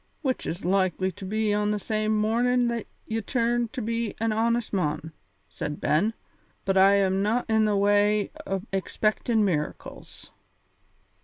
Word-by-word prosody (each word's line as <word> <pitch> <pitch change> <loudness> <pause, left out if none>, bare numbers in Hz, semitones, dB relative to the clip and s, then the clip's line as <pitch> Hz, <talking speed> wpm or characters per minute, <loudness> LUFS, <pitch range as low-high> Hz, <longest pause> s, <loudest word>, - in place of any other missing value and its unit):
"Which 260 -3 -1
is 175 +3 -4
likely 185 0 +1
to 190 - -10
be 215 +2 0
on 210 0 +1
the 210 - 0
same 215 +1 -1
mornin' 240 +3 +2
that 235 -2 -3 0.2
ye 225 0 -2
turn 240 0 0
to 245 +1 -6
be 230 0 -2
an 225 0 +1
honest 230 +1 0
mon," 160 -3 -1 0.4
said 150 - -5
Ben; 205 +9 +1 0.5
"but 195 -1 +1
I 195 +1 +6
am 195 -1 +2
no' 225 +5 +1
in 220 -1 +3
the 210 -1 +2
way 205 +1 +3 0.2
o' 190 -1 -2
expectin' 215 +3 +1
miracles." 155 -6 -4
210 Hz, 155 wpm, -26 LUFS, 195-225 Hz, 0.5 s, I